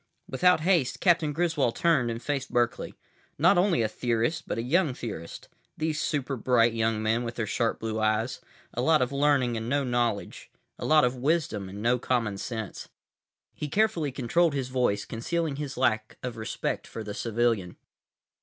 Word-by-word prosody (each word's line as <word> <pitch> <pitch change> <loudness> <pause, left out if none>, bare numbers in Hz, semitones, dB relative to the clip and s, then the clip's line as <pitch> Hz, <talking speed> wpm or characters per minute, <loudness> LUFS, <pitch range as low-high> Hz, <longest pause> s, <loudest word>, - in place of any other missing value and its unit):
———— - - -45
Without 180 +5 +3
haste, 165 -7 +2
Captain 170 -4 +3
Griswold 155 -6 0
turned 155 -8 +2
and 115 +1 -5
faced 140 -2 -2
Berkeley. 120 -1 0 0.4
Not - - +5
only 180 - +3
a - - +2
theorist, 120 +8 -1
but - - -3
a 115 - -1
young 150 +1 +2
theorist. 90 -10 -7 0.3
These 155 -1 -1
super 140 -2 -1
bright 120 -1 +3
young 115 -1 0
men 110 +2 +1
with 115 -1 -5
their 115 - -2
sharp 115 +2 -1
blue 110 -1 -3
eyes. 110 +4 0 0.3
A 120 - -2
lot 155 0 +4
of 125 - -3
learning 140 -4 +2
and 110 +1 -4
no 140 +1 +1
knowledge. 120 -4 -2 0.3
A - - -4
lot 155 -3 +5
of 125 +1 -1
wisdom 130 - 0
and 100 +2 -7
no 120 +1 +2
common 115 -6 -1
sense. 110 -3 -5 0.6
He 150 - -5
carefully 170 -6 +1
controlled 145 +5 +1
his 130 -2 -2
voice, 125 -6 0
concealing 155 +5 -2
his 145 -3 -5
lack 110 -4 0
of 125 -2 -4
respect 110 -1 -3
for 115 - -7
the 105 -1 -6
civilian. 115 -5 0
125 Hz, 180 wpm, -27 LUFS, 115-150 Hz, 0.6 s, Not